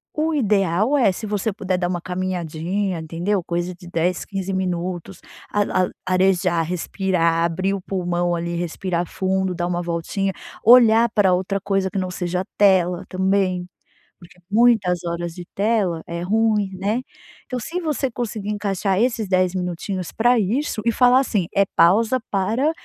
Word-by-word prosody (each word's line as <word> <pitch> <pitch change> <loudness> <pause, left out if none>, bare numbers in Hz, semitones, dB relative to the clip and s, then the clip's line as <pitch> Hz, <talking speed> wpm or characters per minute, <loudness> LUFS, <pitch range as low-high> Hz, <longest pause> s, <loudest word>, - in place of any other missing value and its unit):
o 315 +1 0
ideal 210 - +2
é 235 -8 +4
se 200 +4 -6
você 210 +1 -1
puder 190 -2 -2
dar 180 -1 0
uma 180 -1 -2
caminhadinha, 180 +1 -2
entendeu, 170 +5 -2
coisa 175 +1 -2
de 175 0 -14
10, 175 +1 0
15 195 -1 -4
minutos, 180 0 -3 0.3
a 205 - +1 0.2
a - - -6 0.2
arejar, 185 -2 +2
respirar, 170 -1 0
abrir 185 +4 -1
o 195 - -6
pulmão 175 -2 -1
ali, 170 0 -3
respirar 175 +1 -2
fundo, 190 0 -1
dar 175 0 -2
uma 175 0 -1
voltinha, 175 +3 -2 0.3
olhar 235 -1 +7
pra 205 -4 +3
outra 190 +2 -1
coisa 195 -1 0
que 200 - -4
não 185 -1 -3
seja 180 0 -2
tela, 180 -3 +3
também, 185 -1 0 0.5
porque 175 0 -17
muitas 210 -6 +3
horas 170 0 -3
de 175 -1 -8
tela 200 -5 +1
é 170 0 -4
ruim, 210 0 +1
né. 205 +6 -1 0.4
Então, 255 -2 -4
se 335 +9 -4
você 300 -5 -1
conseguir 220 -3 -4
encaixar 200 -2 -1
esses 230 -3 0
10 185 -1 +2
minutinhos 180 0 -3
pra 240 +1 +3
isso, 220 +4 -1
e 235 - +3
falar 250 +2 +5
assim: 215 -9 0
"É 200 - +4
pausa 220 +9 +4
para, 220 +10 +1
190 Hz, 160 wpm, -21 LUFS, 175-210 Hz, 0.5 s, olhar